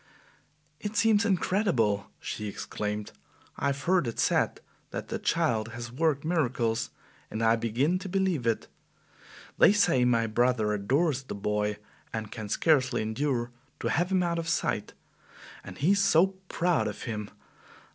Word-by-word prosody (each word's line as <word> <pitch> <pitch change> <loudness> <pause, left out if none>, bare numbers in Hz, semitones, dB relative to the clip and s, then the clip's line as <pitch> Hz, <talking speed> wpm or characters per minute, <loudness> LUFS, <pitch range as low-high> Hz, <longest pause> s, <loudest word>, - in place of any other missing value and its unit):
"It 210 +1 -5
seems 225 -1 +4
incredible!" 175 - +1
she 105 - -5
exclaimed. 105 +1 -4 0.5
"I 140 - 0
have 140 0 -2
heard 175 -5 +2
it 115 - -4
said - - +1 0.3
that - - -6
the - - -3
child 110 -1 0
has 120 0 -6
worked 150 +1 0
miracles, 120 -8 0 0.4
and 110 - -3
I 115 0 +5
begin 125 +10 0
to 190 - -7
believe 185 -9 0
it. 115 - 0 0.9
They - - +8
say 200 -11 +3
my 115 -2 +3
brother 115 -1 +1
adores 135 +8 +1
the 130 - -7
boy 105 0 -1 0.3
and 110 -1 -5
can 110 -2 -6
scarcely 135 -6 +2
endure 120 +1 -1 0.3
to 115 - -1
have 175 +8 +1
him 185 -1 +3
out 170 -1 0
of 165 0 -3
sight. - - -1 0.7
And - - -10
he 160 +7 +3
is 200 0 +3
so 190 0 +4 0.2
proud 165 -10 +1
of 105 - -6
him! 105 -4 -4
125 Hz, 155 wpm, -28 LUFS, 110-170 Hz, 0.9 s, They